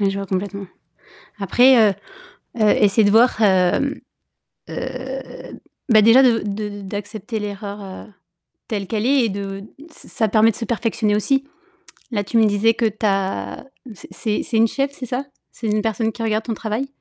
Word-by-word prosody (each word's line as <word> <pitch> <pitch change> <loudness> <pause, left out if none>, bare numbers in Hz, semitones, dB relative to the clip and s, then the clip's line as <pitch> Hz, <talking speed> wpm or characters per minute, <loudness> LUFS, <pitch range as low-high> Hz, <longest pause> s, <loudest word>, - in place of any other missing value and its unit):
Ouais, 200 -1 +2
je 195 - -4
vois 195 - -4
complètement. 195 +1 -3 0.7
Après, 230 +2 +5
heu, - - -3 0.7
heu, 215 - +4
essaie 210 +2 +4
de 205 - +3
voir, 230 +1 +4
hem, 190 +7 +2 0.7
heu, - - -5 1.1
bah, 220 -3 +6
déjà 230 +5 +7
de 240 -3 +4
de 205 0 -4
d'accepter 205 +3 -5
l'erreur, 205 0 -6
heu, 190 -1 -9 0.6
telle 200 -4 -3
qu'elle 220 0 -2
est 270 -2 +3
et - - 0
de 195 0 -5
d 205 - -12 0.2
ç - - -17
ç - - -15
ça 225 -4 0
permet 220 +2 +4
de - - -11
se 230 - -5
perfectionner 220 -2 0
aussi. 270 +6 +1 0.7
Là 205 -3 -1
tu 230 +4 -1
me 225 - +5
disais 210 +2 +3
que 230 - -1
tu 215 0 -2
as 190 - -1 0.3
c'est - - -13
c'est 215 -2 -2
c'est 230 - -2
une 225 +1 +5
cheffe 275 +4 -2
c'est 260 - -7
ça? 250 +4 -3 0.3
C'est 225 - -6
une 210 0 +1
personne 225 0 -1
qui 230 - -6
regarde 220 0 -1
ton 230 - -2
travail? 220 +5 -3
215 Hz, 190 wpm, -20 LUFS, 200-230 Hz, 1.1 s, déjà